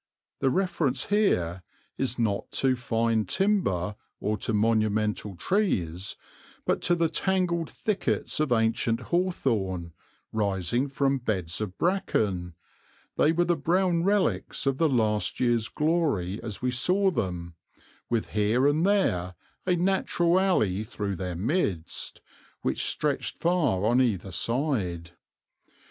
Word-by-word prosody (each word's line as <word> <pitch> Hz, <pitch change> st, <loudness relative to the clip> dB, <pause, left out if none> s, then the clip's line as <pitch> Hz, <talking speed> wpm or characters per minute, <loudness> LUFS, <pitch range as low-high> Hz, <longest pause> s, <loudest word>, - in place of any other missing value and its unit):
The 135 Hz, -, +2 dB
reference 160 Hz, -6 st, 0 dB
here 95 Hz, -, +2 dB, 0.3 s
is 125 Hz, -2 st, -2 dB
not 110 Hz, -4 st, -1 dB
to 130 Hz, -1 st, +2 dB
fine 115 Hz, -2 st, 0 dB
timber 105 Hz, -, +1 dB, 0.2 s
or 105 Hz, -, 0 dB
to 115 Hz, -, -1 dB
monumental 110 Hz, -2 st, +1 dB
trees, 95 Hz, -, -1 dB, 0.5 s
but -, -, +1 dB
to 175 Hz, -, +2 dB
the 170 Hz, -1 st, +2 dB
tangled 175 Hz, -2 st, 0 dB
thickets 210 Hz, -7 st, -2 dB
of 155 Hz, -4 st, +1 dB
ancient 115 Hz, 0 st, +2 dB
hawthorn, 115 Hz, -, -1 dB, 0.4 s
rising 100 Hz, +4 st, 0 dB
from 135 Hz, 0 st, 0 dB
beds 95 Hz, -7 st, -2 dB
of 100 Hz, -3 st, -4 dB
bracken 100 Hz, -, 0 dB, 0.6 s
they 150 Hz, -, +4 dB
were 175 Hz, +1 st, +2 dB
the 175 Hz, 0 st, +2 dB
brown 170 Hz, +2 st, +1 dB
relics 200 Hz, -5 st, +1 dB
of 135 Hz, -1 st, 0 dB
the 165 Hz, -2 st, +4 dB
last 110 Hz, -5 st, +1 dB
year's 120 Hz, -3 st, +2 dB
glory 150 Hz, -, 0 dB
as 110 Hz, -2 st, -6 dB
we 125 Hz, -, +1 dB
saw 185 Hz, +10 st, +2 dB
them 90 Hz, -, -3 dB, 0.6 s
with 115 Hz, -2 st, -1 dB
here 110 Hz, +5 st, +2 dB
and 155 Hz, +5 st, +3 dB
there 90 Hz, -, +1 dB, 0.3 s
a 180 Hz, -, +3 dB
natural 175 Hz, -1 st, +2 dB
alley 110 Hz, -, +2 dB
through 100 Hz, -2 st, -4 dB
their 90 Hz, 0 st, -4 dB
midst, 100 Hz, -, -2 dB, 0.4 s
which -, -, 0 dB
stretched -, -, -1 dB
far 150 Hz, -, +1 dB
on 120 Hz, +3 st, +4 dB
either 100 Hz, -6 st, 0 dB
side. 95 Hz, -, -1 dB
120 Hz, 125 wpm, -27 LUFS, -, 0.6 s, they